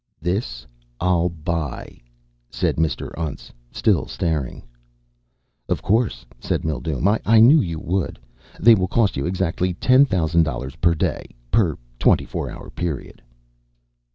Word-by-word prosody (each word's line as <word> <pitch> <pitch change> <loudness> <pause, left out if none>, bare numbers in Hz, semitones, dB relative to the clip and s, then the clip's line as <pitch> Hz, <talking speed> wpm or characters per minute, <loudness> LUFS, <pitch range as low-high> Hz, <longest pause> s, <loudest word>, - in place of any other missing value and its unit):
"This 90 - -3 0.3
I'll 90 -1 +2
buy," 80 -4 -4 0.5
said - - -1
Mr. 80 0 -1
Untz, 80 -4 -5 0.2
still - - +1
staring. 80 -7 -3 1.1
"Of - - -1
course," 100 - 0
said - - -2
Mildume. 80 - 0
"I 110 +1 +5
knew 140 +8 +7
you 85 -3 -3
would. 90 +2 -2 0.4
They 115 +3 +7
will 95 -4 +1
cost 110 -2 +1
you 70 - -2
exactly 90 0 -1
ten 130 +9 +5
thousand 85 -5 +2
dollars 65 -3 -3
per 85 -1 +2
day. 75 - -2 0.2
Per 95 -9 +2 0.2
twenty - - +3
four - - -4
hour - - -10
period." 85 -6 -5
85 Hz, 130 wpm, -22 LUFS, 80-95 Hz, 1.1 s, knew